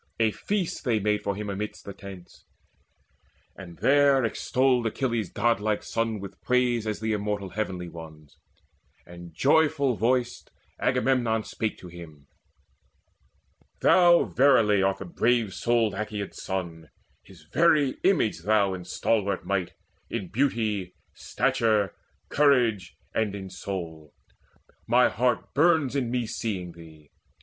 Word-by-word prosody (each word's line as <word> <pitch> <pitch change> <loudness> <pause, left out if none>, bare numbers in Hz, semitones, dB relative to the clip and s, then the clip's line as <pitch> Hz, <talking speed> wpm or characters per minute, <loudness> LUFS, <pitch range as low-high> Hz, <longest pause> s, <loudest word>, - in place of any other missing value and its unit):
A 110 -1 +3
feast 195 - -3
they 120 -6 +1
made 105 0 0
for 100 -1 -2
him 105 +1 -5
amidst 100 +1 -5
the 100 - -7
tents, 95 -2 -12 1.1
And 85 -4 -11
there 140 -2 +4
extolled 125 +1 +1
Achilles' 115 -3 -2
godlike 110 -2 0
son 115 -2 -2
With 95 0 -10
praise 125 -3 +1
as 105 - -2
of - - -17
the 110 0 0
immortal 105 -2 -3
Heavenly 95 -4 -4
Ones; 80 -3 -12 0.7
And 85 0 -11
joyful 140 - +2
voiced 125 +3 -1 0.3
Agamemnon 125 -3 +1
spake 110 0 -4
to 90 - -11
him: 85 -4 -12 1.6
"Thou 175 -1 +6
verily 115 -7 +3
art 95 0 +1
the 100 - -8
brave 115 +2 +1
souled 115 -3 +1
Aeacid's 105 -1 -5
son, 85 -5 -5 0.3
His 90 -5 -17
very 150 - +3
image 175 - +2
thou 100 +1 +2
in 90 -1 -7
stalwart 100 -2 -1
might, 95 -3 -2 0.4
In 100 -7 -4
beauty, 110 -8 -1 0.2
stature, 105 -5 0 0.4
courage, 120 -10 +2 0.2
and 105 -3 -1
in 95 -2 -8
soul. 85 -5 -7 0.7
Mine 125 +2 +4
heart 110 -5 -1
burns 150 -3 +3
in 130 -4 0
me 120 -1 -1
seeing 100 -6 -4
thee. 80 -3 -15
105 Hz, 130 wpm, -26 LUFS, 95-125 Hz, 1.6 s, Thou